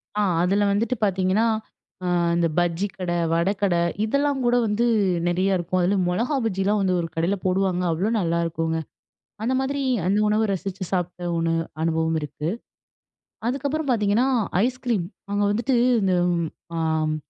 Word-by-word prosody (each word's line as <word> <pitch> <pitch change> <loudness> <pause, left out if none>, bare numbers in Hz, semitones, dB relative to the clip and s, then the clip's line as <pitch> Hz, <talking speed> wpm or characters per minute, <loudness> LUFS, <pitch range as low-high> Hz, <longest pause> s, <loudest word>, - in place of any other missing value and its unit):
ஆ, 210 - +1 0.2
அதில 200 +3 +2
வந்துட்டு 230 +5 0
பார்த்தீங்கன்னா, 190 +2 +2 0.6
அ - - -1 0.3
இந்த 170 0 +2
பஜ்ஜிக்கடை, 175 0 -1 0.2
வடக்கடை 180 +1 +1 0.2
இதெல்லாங்கூட, 270 0 +1
வந்து 210 +3 +1 0.4
நெறைய 185 +2 +2
இருக்கும். 180 +1 -1
அதில 185 +3 +2
மொளகா 235 +11 0
பஜ்ஜில்லாம் 200 0 +1
வந்து 185 -1 +1
ஒரு 165 - -3
கடைல 170 +5 +1
போடுவாங்க. 185 -1 +1
அவ்ளோ 185 +7 0
நல்லாருக்குங்க. 165 -2 -1 0.6
அந்த 255 +3 +1
மாதிரி 275 +1 -1 0.3
அந்த 195 +2 +2
உணவு 215 +1 +2
ரசித்து 195 0 -4
சாப்ட 180 -1 -2 0.2
ஒண்ணு 165 0 +1 0.3
அனுபவம் 160 0 +1
இருக்கு. 150 +2 -4 1.0
அதுக்கப்பறம் 280 +3 -1
பார்த்தீங்கன்னா, 225 +2 +2 0.4
ஐஸ்கிரீம். 245 -7 -1 0.3
அங்க 205 0 +1
வந்துட்டு 240 +5 0 0.3
இந்த 190 -2 +2 0.6
அ - - -1 0.3
ம் 155 - -1
195 Hz, 130 wpm, -24 LUFS, 175-220 Hz, 1.0 s, அதில